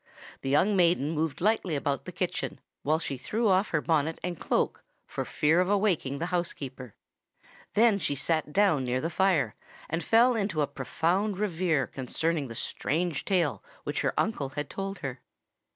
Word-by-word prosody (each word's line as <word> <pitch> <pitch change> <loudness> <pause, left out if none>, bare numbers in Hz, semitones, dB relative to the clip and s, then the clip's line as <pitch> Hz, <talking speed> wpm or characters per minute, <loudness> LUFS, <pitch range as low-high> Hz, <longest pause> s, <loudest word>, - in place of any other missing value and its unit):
The 135 - -3
young 180 +9 +3
maiden 170 -5 +3
moved 160 -2 -2
lightly 200 -5 +2
about 140 -1 -1
the - - -6
kitchen, - - -3 0.2
while 155 +2 +2
she 140 -5 -4
threw 220 - 0
off 190 +1 +3
her 155 - +1
bonnet 160 0 +1
and 175 -2 -3
cloak, - - 0 0.2
for - - -4
fear 155 +3 +2
of 185 - 0
awaking 195 -9 +1
the 165 - -2
housekeeper. 135 - -3 0.8
Then 220 -2 +5
she 145 - -1
sate 155 +2 0
down 190 -7 +3
near 125 0 0
the 165 +5 -2
fire, 180 -5 +2 0.3
and 165 +2 -2
fell 235 +7 +5
into 200 -7 0
a - - +3
profound 170 +9 -1
reverie 175 -8 +1
concerning 150 +3 -1
the 115 - -8
strange 160 +6 -1
tale 180 -6 +1 0.2
which - - -2
her - - 0
uncle 150 -11 0
had 145 +1 -5
told 195 0 -4
her. 130 -2 -5
165 Hz, 170 wpm, -28 LUFS, 145-195 Hz, 0.8 s, Then